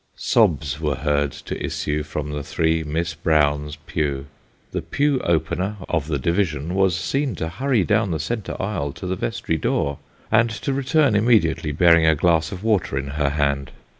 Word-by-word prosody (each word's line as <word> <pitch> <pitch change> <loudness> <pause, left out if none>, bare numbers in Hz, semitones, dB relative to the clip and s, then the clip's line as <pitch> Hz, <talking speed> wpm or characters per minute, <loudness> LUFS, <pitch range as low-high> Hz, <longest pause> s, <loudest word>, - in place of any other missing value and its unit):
Sobs 75 -3 +1
were 75 -3 0
heard 75 0 0
to - - -7
issue 75 +1 -2
from 75 0 -5
the 75 0 -3
three 80 +3 0
Miss 80 +3 -2
Browns' 75 -2 +1
pew; 70 -3 -2 0.5
the - - -2
pew 145 -1 +1
opener 85 +3 0
of 80 -4 -1
the 75 -3 0
division 85 0 -1
was 95 -2 +2
seen 135 +1 -1
to 80 - -3
hurry 120 +5 +1
down 105 +1 +1
the 80 -2 -1
centre 100 +7 -4
aisle 95 -9 -2
to - - -8
the 95 +1 -1
vestry - - -2
door, 70 -1 -1 0.3
and 115 +1 +4
to 115 +5 -3
return 140 -2 +2
immediately, 105 -8 +3
bearing 85 +1 +5
a 80 - +5
glass 80 0 +2
of 95 +1 -7
water 105 -10 +1
in 70 0 -3
her 70 0 0
hand. 70 -1 0
80 Hz, 175 wpm, -22 LUFS, 75-100 Hz, 0.5 s, bearing